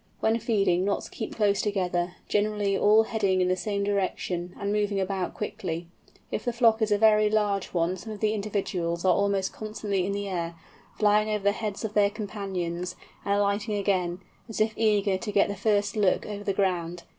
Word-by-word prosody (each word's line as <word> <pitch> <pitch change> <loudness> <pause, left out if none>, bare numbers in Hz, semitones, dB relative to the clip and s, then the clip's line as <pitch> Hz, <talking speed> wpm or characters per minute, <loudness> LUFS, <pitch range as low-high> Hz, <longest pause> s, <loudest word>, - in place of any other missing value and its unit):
When 225 +1 +2
feeding 195 -6 +2
Knots 200 +1 -1
keep 220 - -6
close 205 -2 +2
together, 180 -3 -1
generally 205 -1 +1
all 215 +3 +5
heading 200 -4 0
in 180 0 +2
the 185 - +2
same 200 +1 -2
direction, 185 -3 -2
and 200 0 -1
moving 205 -1 0
about 190 -1 -2
quickly. 175 -5 -4 0.5
If - - -2
the 245 - 0
flock 230 -2 +3
is 215 -1 +1
a 205 - +4
very 215 0 +5
large 205 -2 +1
one 175 +1 0
some 220 +5 -8
of 210 - -7
the 215 0 +1
individuals 190 -5 -2
are 185 - +6
almost 200 0 0
constantly 210 -3 -2
in - - -1
the 200 0 -3
air, 170 -3 -3 0.4
flying 210 0 +3
over 210 -2 -1
the 200 - +4
heads 210 0 -4
of 215 - -4
their 205 -1 +4
companions, 190 -4 -4 0.3
and 200 - +1
alighting 205 +1 0
again, 185 -3 0 0.3
as 225 - -5
if 215 0 +2
eager 205 -3 +2
to 210 - -4
get 200 0 +3
the 200 - -3
first 205 0 +1
look 200 -4 +2
over 205 -1 -6
the 200 - 0
ground. 175 -3 -1
200 Hz, 195 wpm, -27 LUFS, 185-210 Hz, 0.5 s, are